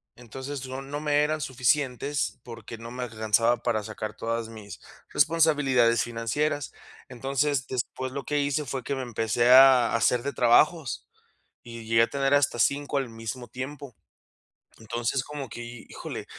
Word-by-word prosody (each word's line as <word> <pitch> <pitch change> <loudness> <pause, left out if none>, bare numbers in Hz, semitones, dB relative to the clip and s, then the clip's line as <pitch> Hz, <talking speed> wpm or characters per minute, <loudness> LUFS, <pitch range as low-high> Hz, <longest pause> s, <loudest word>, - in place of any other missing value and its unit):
Entonces, 130 +3 -7
no 130 +1 -5
no 145 +2 -5
me 150 -1 +2
eran 155 +1 -1
suficientes, 135 +2 0
porque 115 -1 -9
no 115 0 -8
me 125 0 -5
alcanzaba 115 +1 +1
para 115 -2 -1
sacar 110 0 -6
todas 115 0 -3
mis 110 -3 -10 0.3
responsabilidades 140 -8 +3
financieras. 120 +5 -2 0.4
Entonces, 135 +2 -1
después 130 +1 -4
lo 140 - -4
que 150 0 0
hice, 145 +1 0
fue 130 0 -4
que 140 +3 -2
me 135 - -4
empecé 120 0 0
a 130 -2 +7
hacer 120 +2 +2
de 140 0 -3
trabajos, 125 - +2 0.6
y 115 -1 -9
llegué 115 0 +4
a - - +4
tener 140 0 +1
hasta 145 -3 +2
5 145 +2 +1
al 135 -2 -2
mismo 115 +2 -7
tiempo. 130 0 -7 0.8
Entonces, 120 +3 -2
como 145 -3 -7
que, 120 - -8 0.3
híjole, - - -7
125 Hz, 155 wpm, -26 LUFS, 115-140 Hz, 0.8 s, a